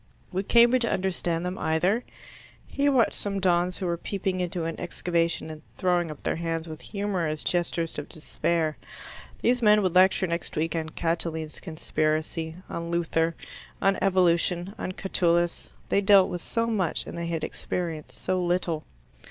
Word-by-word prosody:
Would 190 +1 -2
Cambridge 240 +1 +5
understand 180 -5 -1
them 180 +1 -3
either? 180 +9 +1 0.6
He 285 +1 +1
watched 255 -5 +3
some 200 -1 0
dons 180 -1 +2
who 190 - -3
were 170 -1 0
peeping 190 0 -2
into 175 -1 -2
an 165 0 -4
excavation, 170 -2 -1
and 155 -1 -9 0.2
throwing 175 -2 +1
up 150 - -9
their - - 0
hands 165 0 -2
with 155 -1 -8
humorous 185 -7 -2
gestures 170 -2 -1
of 145 - -7
despair. 160 0 -1 0.7
These 245 +1 +3
men 210 -2 +5
would 185 -3 +1
lecture 185 +1 +5
next 170 -1 -3
week 165 +2 0
on 160 -1 -2
Catiline's 165 -1 -2
conspiracy, 155 0 -2
on 170 0 -5
Luther, 165 -1 +1 0.4
on 195 0 +2
Evolution, 180 -1 +2
on - - -3
Catullus. 175 -2 +1 0.2
They 200 - +3
dealt 195 -1 +6
with 175 - -4
so 230 +6 -1
much 205 -8 0
and - - -7
they 170 0 -3
had 165 -2 -2
experienced 165 -4 -4
so 185 0 -1
little. 175 -3 0
175 Hz, 160 wpm, -27 LUFS, 165-190 Hz, 0.7 s, dealt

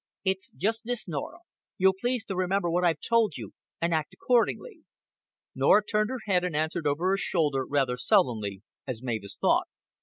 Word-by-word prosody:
"It's 190 +4 0
just 225 +1 -1
this, 245 -3 0
Norah. 170 - -5 0.4
You'll 190 +1 +4
please 245 +4 -2
to 195 - -4
remember 185 -1 0
what 175 +2 +1
I've 165 -4 +2
told 230 -8 +2
you, 110 -5 -8 0.3
and 170 0 0
act 155 -2 -2
accordingly." 255 - 0 0.7
Norah 210 0 +4
turned 215 0 +1
her 260 -2 -4
head 185 -3 +2
and 180 -4 -2
answered 160 +1 -1
over 155 +6 +1
her 195 - +2
shoulder, 150 -9 0
rather 135 -3 0
sullenly, 105 -6 +1 0.2
as 125 -2 -4
Mavis 110 -5 -4
thought. - - +2
180 Hz, 175 wpm, -27 LUFS, 140-215 Hz, 0.7 s, You'll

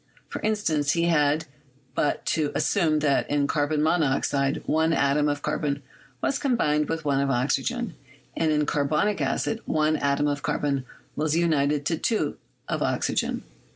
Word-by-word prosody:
For - - -5
instance, 160 -9 +1
he 170 - +1
had 155 -2 +2 0.5
but 145 - 0
to 155 -2 0
assume 155 -6 +2
that 140 -2 +1
in 145 -1 +2
carbon 150 +1 0
monoxide 140 -3 +1
one 160 +1 +2
atom 145 0 +2
of 145 0 -3
carbon 140 -1 -1 0.4
was 275 - +1
combined 150 - +1
with 165 -1 -3
one 140 -1 +2
of 140 - 0
oxygen, 165 - 0 0.4
and 160 -1 +1
in 150 0 +2
carbonic 150 +8 0
acid 140 +11 -1
one 155 0 +2
atom 140 0 +1
of 145 -1 -1
carbon 140 -2 -1 0.3
was 155 0 0
united 150 -4 +1
to 165 0 0
two 225 - 0 0.3
of - - -2
oxygen. - - -1
150 Hz, 155 wpm, -25 LUFS, 145-160 Hz, 0.5 s, had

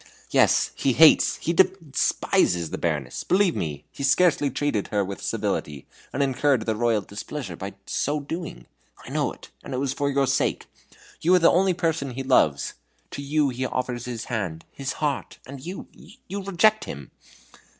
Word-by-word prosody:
"Yes - - +4
he 135 - +1
hates, 160 +4 +6
he 170 - -2
despises 165 - +1
the - - -4
Baroness. 75 -7 -2
Believe 185 -1 +2
me, 75 -2 -4
he - - -10
scarcely 145 +1 +3
treated 135 -6 -1
her 100 -2 0
with 100 0 -7
civility, 70 -3 -3 0.3
and 140 - 0
incurred 135 -2 +1
the 110 - 0
Royal 115 -1 +1
displeasure 100 - -6
by 95 +4 -7
so 150 +2 -1
doing. 160 +3 -6 0.4
I - - -9
know - - 0
it; - - -14
and - - -5
it - - -1
was 135 -1 -1
for 140 +1 -1
your 140 0 +2
sake. - - 0 0.6
You 180 +3 +4
are - - +7
the 170 -2 +5
only 185 0 +3
person 160 -7 -1
he 135 - -3
loves 75 - +2 0.4
to - - -5
you 145 0 +1
he 130 +1 -4
offers 125 -1 -3
his 120 -3 -5
hand, 95 -9 -4
his 135 0 -4
heart 145 -3 -3
and 135 0 -9
you! 180 +4 -6
you 200 +2 -9
reject 200 +3 +3
him!" 70 -1 -8
135 Hz, 175 wpm, -25 LUFS, 110-160 Hz, 0.6 s, are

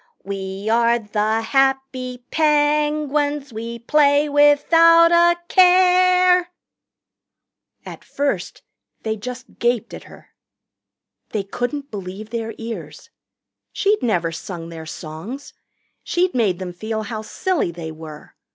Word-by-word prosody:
"We 195 +1 -6
are 235 +1 +3
the 215 0 -1
happy 265 0 -1
Penguins 295 -2 +1
We 230 +2 -6
play 285 +4 +3
without 330 +4 +5
a 345 0 +4
care.. 365 -1 +4 0.7
." - - -51
At - - -10
first 285 0 -3 0.4
they 220 -1 -2
just 250 +4 -9
gaped 240 -1 0
at - - -9
her. - - -17 1.0
They 210 -3 -1
couldn't 245 +8 -4
believe 200 +1 -7
their 225 -1 -4
ears. 230 0 -8 0.6
She'd 415 +1 +1
never 175 -8 0
sung 165 0 -7
their 160 -1 -9
songs. 165 - -8 0.5
She'd 360 +1 0
made 210 -8 +1
them 180 -1 -6
feel 220 +4 -4
how 215 0 -5
silly 315 - -2
they 165 -1 -7
were. 155 -1 -11
245 Hz, 115 wpm, -20 LUFS, 210-300 Hz, 1.0 s, without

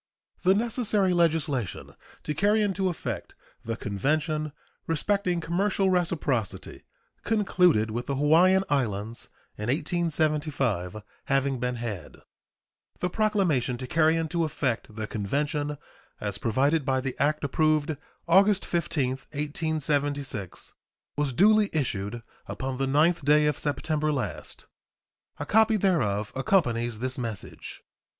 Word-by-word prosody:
The 190 +1 +4
necessary 215 -4 +1
legislation 155 - 0 0.3
to 150 - -2
carry 205 +7 +3
into 195 -2 0
effect 120 - -5 0.3
the 115 0 -3
convention 150 - -1 0.4
respecting 180 +2 +1
commercial 190 +3 +1
reciprocity 150 - -1 0.4
concluded 180 - +2
with 120 +2 -4
the 140 - -1
Hawaiian 170 +7 +5
Islands 115 -5 -2 0.3
in 105 - -3
1875 145 - 0 0.2
having 135 -1 +1
been 125 0 -1
had, 110 -9 -6 0.8
the 180 - -1
proclamation 185 - +1
to 130 - -6
carry 160 +4 +3
into 165 +1 0
effect 125 -7 -2
the 110 0 -3
convention, 145 +8 -2 0.4
as 100 -1 -4
provided 140 +7 +2
by 130 -1 +1
the 130 0 -3
act 150 +1 +1
approved 155 +1 +1 0.3
August 195 +3 +4
15, 155 -6 0 0.3
1876, 145 - -2 0.4
was 145 -2 0
duly 210 - +4
issued 120 -6 -2 0.2
upon 130 0 -4
the 135 0 0
9th 155 +4 +3
day 150 +2 +5
of 150 -2 0
September 155 +1 0
last. 135 -4 -4 0.7
A 145 - -4
copy 220 +5 +4
thereof 115 - +1
accompanies 120 - +1
this 130 +3 -3
message. 115 -6 -7
150 Hz, 115 wpm, -27 LUFS, 125-170 Hz, 0.8 s, Hawaiian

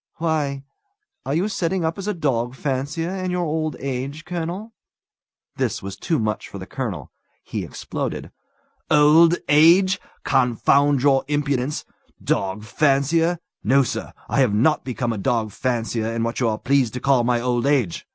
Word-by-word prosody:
"Why, 150 -4 -1 0.6
are 140 - 0
you 180 +5 +1
setting 185 -3 -1
up 165 +4 -2
as 195 - -5
a 210 - 0
dog 125 -6 -1
fancier 145 +6 -2
in 185 -1 -3
your 180 -1 -1
old 155 -1 -2
age, 140 +4 -4
colonel?" 180 +5 -5 0.8
This - - -1
was 100 0 -5
too 165 -3 -1
much 110 -4 -2
for - - -8
the - - -7
colonel. - - -5 0.3
He - - -4
exploded. - - -5 0.6
"Old 155 +3 +6
age! 175 +6 +5 0.2
Confound 135 +2 +3
your 135 -2 +4
impudence! 145 -1 -1 0.3
Dog 95 +2 -1
fancier! 155 +7 +2 0.3
No, 135 +5 +4
sir! 120 - -4 0.2
I - - 0
have 120 -6 +3
not 150 +9 +2
become 120 -2 -2
a 105 - -5
dog 110 +2 0
fancier 115 -1 -2
in 115 0 -2
what 115 0 -2
you 120 -3 +2
are 110 - -1
pleased 135 -3 +1
to - - -2
call 135 -3 +3
my 120 0 +2
old 120 +1 0
age! 130 - 0
140 Hz, 160 wpm, -22 LUFS, 120-160 Hz, 0.8 s, Old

